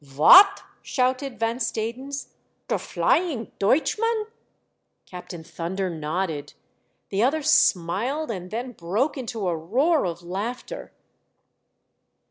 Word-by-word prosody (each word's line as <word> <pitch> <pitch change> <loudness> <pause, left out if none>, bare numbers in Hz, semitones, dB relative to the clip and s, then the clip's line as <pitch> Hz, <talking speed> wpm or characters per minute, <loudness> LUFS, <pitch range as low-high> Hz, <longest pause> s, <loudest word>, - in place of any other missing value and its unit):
" - - -25
Vot 150 - +7
!" - - -35
shouted 255 0 -1
Van 230 +1 0
Stadens. 240 +4 -4 0.2
" - - -46
Der - - 0
Flying 335 - 0
Deutchman 425 - +1 0.4
!" - - -51
Captain 180 -2 -9
Thunder 180 +3 -4
nodded. 160 -1 -3 0.5
The 195 - -1
other 290 +6 +1
smiled, 235 - +2
and 185 -3 -6
then 240 +4 -4
broke 215 - -1
into 230 -7 -4
a 175 - 0
roar 255 - +1
of 170 0 -6
laughter. 220 - -5
225 Hz, 120 wpm, -24 LUFS, 180-275 Hz, 0.5 s, Vot